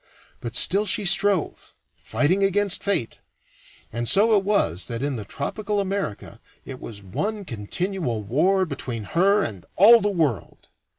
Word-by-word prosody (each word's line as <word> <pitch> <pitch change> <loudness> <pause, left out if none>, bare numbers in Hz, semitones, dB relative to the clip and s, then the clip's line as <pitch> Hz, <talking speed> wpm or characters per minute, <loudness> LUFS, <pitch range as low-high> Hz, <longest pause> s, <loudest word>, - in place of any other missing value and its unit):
But 115 -2 -7
still 200 +4 +4
she 200 +2 +2
strove, 195 -1 +1 0.2
fighting 180 +7 0
against 195 0 +1
fate, 200 - -2 0.7
and 120 0 -1
so 215 +3 +4
it 200 - +2
was 100 - 0
that 115 +1 -5
in 145 -1 -2
the 110 -3 -6
tropical 205 - -4
America 195 - -4 0.2
it 130 -2 -9
was 100 -3 -10
one 205 - -4
continual 125 - -4
war 185 - +1
between 130 -7 -6
her 195 - +2
and 95 -6 -6
all 225 +6 +7
the 205 - 0
world. 160 - -3
180 Hz, 150 wpm, -23 LUFS, -, 0.7 s, all